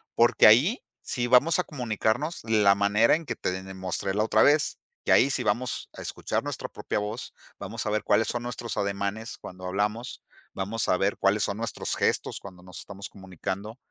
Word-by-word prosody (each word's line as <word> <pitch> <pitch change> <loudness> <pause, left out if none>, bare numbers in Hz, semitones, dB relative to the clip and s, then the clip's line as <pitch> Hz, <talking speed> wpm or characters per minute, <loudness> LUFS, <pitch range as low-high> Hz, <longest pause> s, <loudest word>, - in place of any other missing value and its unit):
porque 120 -2 +6
ahí 145 - +5 0.2
sí 120 -2 -2
vamos 140 +8 +5
a - - +2
comunicarnos 125 - -1
la 105 -3 +4
manera 100 +5 +4
en 165 +1 -5
que 115 -5 -3
te 90 +1 -3
mostré 95 +1 -3
la 105 - +2
otra 110 0 +3
vez, 145 0 +3 0.3
que - - +1
ahí 135 - +5
sí - - 0
vamos 125 0 -1
a - - -9
escuchar - - -2
nuestra - - -5
propia - - -3
voz, 105 +4 -5 0.3
vamos 105 +3 -5
a - - +1
ver 105 -1 0
cuáles 110 - +2
son 120 - -2
nuestros 120 -1 -5
ademanes 100 +4 -2
cuando 90 0 -10
hablamos, 105 +6 -2 0.3
vamos 100 +4 -2
a - - +4
ver 100 +2 0
cuáles 100 +1 +2
son 100 - -1
nuestros 115 0 -2
gestos - - 0
cuando 90 -2 -12
nos 90 -2 -10
estamos 100 0 -8
comunicando, 95 +3 -6
110 Hz, 190 wpm, -27 LUFS, 100-120 Hz, 0.3 s, porque